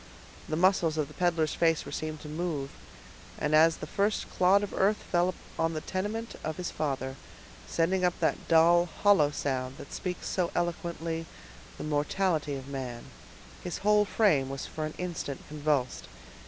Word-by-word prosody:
The 155 Hz, -, 0 dB
muscles 170 Hz, -2 st, +3 dB
of 150 Hz, -2 st, 0 dB
the -, -, -13 dB
peddler's 170 Hz, -3 st, +1 dB
face 165 Hz, -2 st, +2 dB
were -, -, -7 dB
seen 155 Hz, 0 st, -3 dB
to -, -, -8 dB
move, 150 Hz, -3 st, -3 dB, 0.7 s
and 150 Hz, 0 st, -1 dB
as 160 Hz, +1 st, +6 dB
the -, -, -6 dB
first 200 Hz, +6 st, 0 dB
clod 190 Hz, +3 st, +4 dB
of 205 Hz, -, -4 dB
earth 205 Hz, +2 st, +3 dB
fell 175 Hz, 0 st, 0 dB, 0.2 s
on 165 Hz, 0 st, +1 dB
the 155 Hz, -, -2 dB
tenement 210 Hz, +7 st, -3 dB
of 155 Hz, 0 st, -3 dB
his 180 Hz, -, -3 dB
father, 135 Hz, -3 st, -2 dB, 0.5 s
sending 180 Hz, +3 st, +1 dB
up 180 Hz, -1 st, +1 dB
that -, -, 0 dB
dull, 170 Hz, +2 st, +5 dB, 0.2 s
hollow 195 Hz, -8 st, +6 dB
sound 130 Hz, -3 st, -2 dB
that -, -, -10 dB
speaks 180 Hz, -1 st, -4 dB
so 180 Hz, -3 st, 0 dB
eloquently 165 Hz, -1 st, -2 dB, 0.5 s
the -, -, -6 dB
mortality 150 Hz, +1 st, 0 dB
of 135 Hz, -1 st, -7 dB
man, 130 Hz, -4 st, -6 dB, 0.5 s
his 175 Hz, -, -3 dB
whole 210 Hz, 0 st, +5 dB
frame 165 Hz, -12 st, +3 dB
was 135 Hz, 0 st, -4 dB
for 155 Hz, -1 st, -4 dB
an 155 Hz, -, -9 dB
instant 170 Hz, -6 st, -4 dB
convulsed. 145 Hz, -4 st, -1 dB
165 Hz, 165 wpm, -29 LUFS, 150-180 Hz, 0.7 s, as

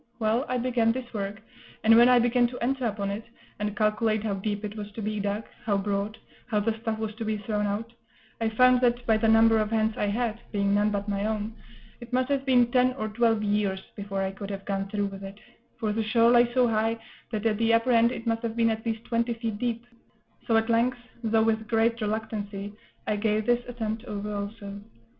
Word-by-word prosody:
Well, 225 Hz, +3 st, +1 dB
I 255 Hz, -, 0 dB
began 240 Hz, -2 st, +2 dB
this 245 Hz, 0 st, -6 dB
work; 200 Hz, 0 st, -4 dB, 0.4 s
and 225 Hz, +1 st, +7 dB
when 240 Hz, +2 st, +7 dB
I 250 Hz, -, +6 dB
began 245 Hz, 0 st, +3 dB
to 250 Hz, +1 st, -8 dB
enter 255 Hz, 0 st, 0 dB
upon 200 Hz, -2 st, -2 dB
it, 210 Hz, +3 st, -4 dB, 0.4 s
and 210 Hz, 0 st, -3 dB
calculate 215 Hz, 0 st, +1 dB
how 215 Hz, -2 st, -1 dB
deep 205 Hz, +2 st, -3 dB
it 210 Hz, 0 st, -6 dB
was 210 Hz, -1 st, -6 dB
to 225 Hz, -, -6 dB
be 215 Hz, 0 st, -2 dB
dug, 205 Hz, +2 st, -2 dB, 0.2 s
how 210 Hz, -4 st, +1 dB
broad, 200 Hz, +1 st, -2 dB, 0.3 s
how 215 Hz, -4 st, +1 dB
the 220 Hz, +2 st, 0 dB
stuff 225 Hz, -1 st, -2 dB
was 220 Hz, -1 st, -3 dB
to 225 Hz, -, -4 dB
be 215 Hz, -1 st, -1 dB
thrown 210 Hz, 0 st, -1 dB
out, 220 Hz, +3 st, -3 dB, 0.5 s
I 225 Hz, -, +2 dB
found 250 Hz, +2 st, +5 dB
that, 240 Hz, 0 st, +2 dB
by 220 Hz, -1 st, +4 dB
the 225 Hz, +1 st, +1 dB
number 225 Hz, 0 st, +5 dB
of 215 Hz, -1 st, 0 dB
hands 220 Hz, -1 st, +1 dB
I 210 Hz, -, 0 dB
had, 230 Hz, +1 st, -1 dB
being 200 Hz, -1 st, +1 dB
none 205 Hz, +1 st, +3 dB
but 205 Hz, 0 st, -2 dB
my 200 Hz, 0 st, -1 dB
own, 220 Hz, 0 st, -2 dB, 0.5 s
it 240 Hz, 0 st, -11 dB
must 255 Hz, +1 st, +1 dB
have 275 Hz, -1 st, 0 dB
been 245 Hz, -2 st, +4 dB
ten 255 Hz, 0 st, +3 dB
or 215 Hz, -4 st, -4 dB
twelve 225 Hz, 0 st, +2 dB
years 205 Hz, -2 st, 0 dB, 0.2 s
before 200 Hz, -2 st, -3 dB
I 190 Hz, -, -1 dB
could 195 Hz, +1 st, -8 dB
have 195 Hz, -1 st, -6 dB
gone 195 Hz, -1 st, -2 dB
through 205 Hz, 0 st, -1 dB
with 195 Hz, 0 st, -7 dB
it; 195 Hz, +1 st, -9 dB, 0.4 s
for 215 Hz, -2 st, -1 dB
the 225 Hz, -, 0 dB
shore 230 Hz, +2 st, +4 dB
lay 240 Hz, 0 st, +5 dB
so 250 Hz, 0 st, +3 dB
high, 225 Hz, 0 st, +1 dB, 0.3 s
that 215 Hz, -1 st, -3 dB
at 215 Hz, -2 st, +1 dB
the 230 Hz, 0 st, +3 dB
upper 230 Hz, +2 st, +3 dB
end 235 Hz, 0 st, +5 dB
it 240 Hz, -, -6 dB
must 225 Hz, 0 st, 0 dB
have 230 Hz, -2 st, -3 dB
been 230 Hz, -1 st, +3 dB
at 220 Hz, 0 st, -3 dB
least 225 Hz, -1 st, -3 dB
twenty 235 Hz, 0 st, 0 dB
feet 225 Hz, -3 st, -4 dB
deep; 235 Hz, -1 st, -2 dB, 0.6 s
so 225 Hz, -, +4 dB
at 225 Hz, 0 st, +1 dB
length, 235 Hz, +2 st, +2 dB, 0.3 s
though 220 Hz, 0 st, +3 dB
with 220 Hz, -1 st, 0 dB
great 230 Hz, +1 st, +1 dB
reluctancy, 205 Hz, -2 st, -3 dB, 0.3 s
I 210 Hz, -, 0 dB
gave 215 Hz, 0 st, 0 dB
this 240 Hz, +1 st, +2 dB
attempt 225 Hz, -2 st, -4 dB
over 210 Hz, 0 st, -4 dB
also. 200 Hz, 0 st, -6 dB
220 Hz, 230 wpm, -27 LUFS, 210-235 Hz, 0.6 s, and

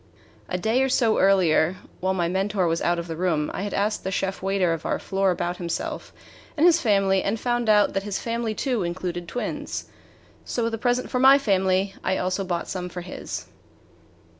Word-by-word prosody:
A 180 Hz, -, -1 dB
day 220 Hz, +7 st, +1 dB
or 265 Hz, -, +2 dB
so 235 Hz, -4 st, +2 dB
earlier, 185 Hz, -3 st, +4 dB, 0.2 s
while 190 Hz, +1 st, 0 dB
my 175 Hz, -2 st, +1 dB
mentor 190 Hz, +1 st, 0 dB
was 165 Hz, 0 st, 0 dB
out 175 Hz, 0 st, +1 dB
of 170 Hz, -, -3 dB
the 165 Hz, -, -4 dB
room, 160 Hz, -3 st, 0 dB
I -, -, -3 dB
had 205 Hz, 0 st, -3 dB
asked 210 Hz, +1 st, 0 dB
the 190 Hz, -, -2 dB
chef 195 Hz, 0 st, -2 dB
waiter 190 Hz, -3 st, +1 dB
of 165 Hz, -, -5 dB
our -, -, 0 dB
floor 195 Hz, 0 st, 0 dB
about 175 Hz, -1 st, -1 dB
himself 170 Hz, -2 st, -4 dB, 0.5 s
and 305 Hz, -, +4 dB
his 340 Hz, -1 st, +5 dB
family, 195 Hz, -4 st, +3 dB
and 215 Hz, +3 st, -1 dB
found 240 Hz, -1 st, -1 dB
that 210 Hz, -2 st, +4 dB
his 200 Hz, -1 st, -3 dB
family 230 Hz, -1 st, -2 dB
too 250 Hz, -4 st, -1 dB
included 175 Hz, 0 st, -3 dB
twins. 245 Hz, +8 st, -4 dB, 0.5 s
So 240 Hz, -, -2 dB
with 230 Hz, -, 0 dB
the 225 Hz, -, -4 dB
present 245 Hz, +1 st, 0 dB
for 250 Hz, -, 0 dB
my 265 Hz, +2 st, +8 dB
family 190 Hz, -5 st, +1 dB
I 190 Hz, -, +1 dB
also 185 Hz, +2 st, -1 dB
brought 175 Hz, -2 st, -3 dB
some 180 Hz, -1 st, -4 dB
for 180 Hz, 0 st, -6 dB
his. 175 Hz, -, -6 dB
195 Hz, 200 wpm, -24 LUFS, 180-220 Hz, 0.5 s, my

